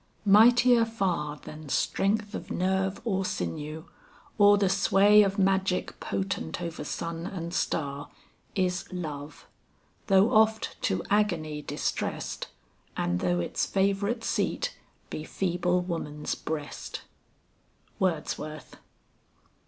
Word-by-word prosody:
"Mightier 235 +4 +6
far 180 -10 -1
Than 155 0 -10
strength 205 +8 0
of - - -6
nerve 190 +1 0
or 195 -4 0
sinew, 150 - -4 0.5
or 205 0 +7
the 200 -1 +2
sway 200 +2 +5
Of 200 0 +1
magic 190 -1 +1
potent 195 -2 -3
over 170 -3 -5
sun 165 +2 -4
and 170 -3 -5
star, 140 -2 -2 0.5
Is 180 -2 -1
love, 155 -5 -6 0.6
though 195 +5 +5
oft 220 0 +3
to 95 - 0
agony 170 -8 +1
distrest, - - -3 0.5
And 90 0 0
though 90 -1 +1
its 85 - -1
favorite 200 +4 0
seat - - -1 0.4
be 155 - -4
feeble 180 +1 0
woman's 155 -4 -3
breast." 150 -2 -5 1.0
WORDSWORTH. 155 -4 -2
185 Hz, 105 wpm, -28 LUFS, 155-200 Hz, 1.0 s, or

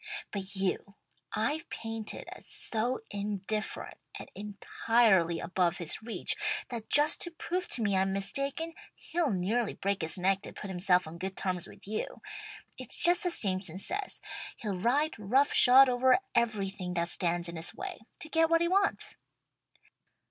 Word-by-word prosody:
"But 195 0 -4
you 195 +1 -1 0.4
I've 305 +10 -1
painted 225 -1 -6
as - - -11
so 255 - -2
indifferent 205 +1 -4 0.2
and - - -10
entirely 205 -3 +2
above 180 -2 0
his 170 +2 -4
reach, 220 -5 -1 0.3
that 230 -3 -6
just 295 +1 +6
to 345 - -2
prove 355 +2 -3
to 235 - -1
me 200 -2 +1
I'm 190 0 +2
mistaken, 275 +11 -1 0.2
he'll 335 -2 -1
nearly 210 +3 0
break 200 0 -1
his 160 +1 -1
neck 190 +2 +2
to - - -9
put 200 - -7
himself 180 0 +2
on 160 +2 -9
good 190 +1 -5
terms 180 -2 -2
with - - -13
you. 215 +1 -4 0.6
It's 255 - -3
just 355 +3 +4
as 345 - +6
Jameson 185 -3 -1
says, 390 - -3 0.4
he'll 205 -4 -3
ride 255 - +1
rough 260 +8 +2
shod 265 +2 +8
over 255 +2 +4 0.2
everything 195 -6 0
that 170 0 0
stands 175 0 0
in 170 - -6
his 165 0 -3
way, - - -6 0.2
to - - -6
get 325 0 +3
what 330 0 +4
he 340 - +3
wants." 395 +3 0
210 Hz, 160 wpm, -30 LUFS, 190-270 Hz, 0.6 s, shod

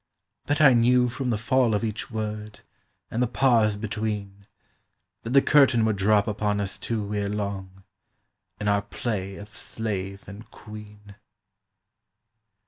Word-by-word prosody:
But 145 +1 +1
I 135 -4 +8
knew 125 +1 +4
From 130 +1 -3
the 115 - +1
fall 120 0 +2
of 105 - -1
each 110 -1 -3
word, 105 -1 -5 0.5
and 115 - -1
the 125 - +3
pause 115 -4 +3
between, 105 -2 -4 0.7
That 115 - -6
the 135 - +6
curtain 130 -6 +5
would 110 -2 0
drop 105 +2 +3
upon 105 -1 -1
us 100 -1 -2
two 105 -3 -3
Ere 100 -1 -1
long, 100 -2 -5 0.8
in 105 - -3
our 100 0 +3
play 100 -2 -4
of 105 +1 -10
slave 100 -2 -4
and 100 +3 -11
queen. 105 -1 -12
105 Hz, 140 wpm, -25 LUFS, 100-115 Hz, 0.8 s, I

